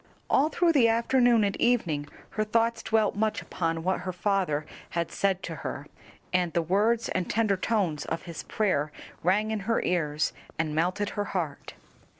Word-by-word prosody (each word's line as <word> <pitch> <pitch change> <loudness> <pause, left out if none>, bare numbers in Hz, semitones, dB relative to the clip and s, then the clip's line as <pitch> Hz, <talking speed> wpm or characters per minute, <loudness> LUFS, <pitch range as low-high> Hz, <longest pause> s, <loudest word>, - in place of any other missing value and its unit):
All 285 +4 +4
through 345 +1 +3
the 270 -7 +5
afternoon 235 0 +4
and 200 -1 0
evening 170 -12 +1 0.2
her 215 - 0
thoughts 230 +2 +1
dwelt 220 -2 +1
much 215 +1 0
upon 165 -2 -2
what 185 +2 +1
her 185 +1 -4
father 180 -5 0 0.3
had 170 -1 -1
said 195 -1 0
to 165 -2 -5
her, 140 - -5 0.5
and 180 -2 +1
the 170 - +1
words 215 +7 +2
and 185 - -1
tender 215 -3 +2
tones 185 -6 0
of 165 - -3
his 170 -2 -6
prayer 155 -9 0 0.3
rang 205 +5 +2
in 220 - -1
her 230 - +3
ears 155 -4 0 0.2
and 155 -1 -1
melted 180 +6 0
her 205 - -2
heart. 155 -5 -4
195 Hz, 170 wpm, -28 LUFS, 165-220 Hz, 0.5 s, the